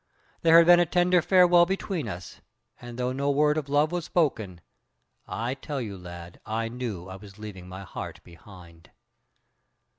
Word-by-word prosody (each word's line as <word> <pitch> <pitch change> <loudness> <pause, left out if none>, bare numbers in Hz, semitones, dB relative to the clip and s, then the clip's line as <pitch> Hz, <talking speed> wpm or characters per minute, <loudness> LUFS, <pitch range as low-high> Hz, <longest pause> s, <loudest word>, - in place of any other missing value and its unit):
There 165 0 +6
had 170 - +7
been 175 0 +7
a 175 - +4
tender 180 0 +3
farewell 175 -1 +5
between 190 -6 -3
us, 90 -3 -8 0.4
and 120 -1 -9
though 125 0 -1
no 140 +2 -1
word 150 +1 +3
of 150 -3 -3
love 145 +2 +2
was 175 -2 -3
spoken, 110 - -1 0.7
I 120 +3 -3
tell 140 +1 -6
you, 105 -5 -5
lad, 85 -1 -11
I 115 +1 -3
knew 115 -7 -6
I 95 0 -8
was 100 0 -14
leaving 100 -4 -9
my 95 +1 -8
heart - - -8
behind. 85 -1 -16
125 Hz, 170 wpm, -26 LUFS, -, 0.7 s, had